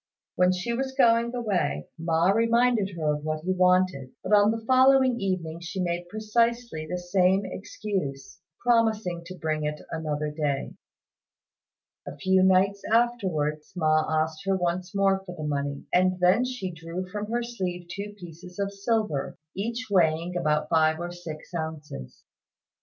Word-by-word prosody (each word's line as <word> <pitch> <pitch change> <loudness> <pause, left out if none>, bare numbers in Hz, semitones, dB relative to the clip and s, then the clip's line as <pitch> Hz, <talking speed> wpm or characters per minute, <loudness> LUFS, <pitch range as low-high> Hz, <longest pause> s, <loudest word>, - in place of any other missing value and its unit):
When 180 0 +4
she 185 +6 -2
was 265 +2 -2
going 235 -1 +4
away, 185 - -1
Ma 165 +2 +2
reminded 230 -2 +2
her 155 -2 +1
of 150 0 -5
what 155 0 -2
he 185 - 0
wanted, 180 -7 +2
but 205 - -1
on 205 0 +6
the 225 0 -2
following 260 0 +5
evening 175 -4 -2
she 170 +2 -6
made 175 -1 -2
precisely 220 -4 0
the 180 - -2
same 185 +2 +2
excuse, 185 -8 -5 0.3
promising 220 -7 +2
to 185 - -8
bring 155 -1 -2
it 150 0 -2
another 150 -2 -2
day. 145 -2 -2 1.3
A - - -6
few 190 0 +3
nights 190 +1 +3
afterwards 185 -11 0
Ma 155 -2 +3 0.2
asked 160 -1 -7
her 195 -1 +2
once 180 +2 -2
more 195 -1 +2
for 180 -2 -8
the 155 - -5
money, 140 -1 -2
and 185 0 +3
then 185 +7 +4
she 250 -8 -4
drew 165 +3 -6
from 210 +2 -5
her 240 +1 0
sleeve 185 -7 -4
two 200 +3 -6
pieces 180 +1 -11
of 200 0 -2
silver, 200 - -1 0.2
each 230 +4 -3
weighing 170 -1 +2
about 155 -3 +1
five 160 0 +3
or 175 0 -4
six 170 -2 -9
ounces. 155 - -6
180 Hz, 155 wpm, -26 LUFS, 160-210 Hz, 1.3 s, on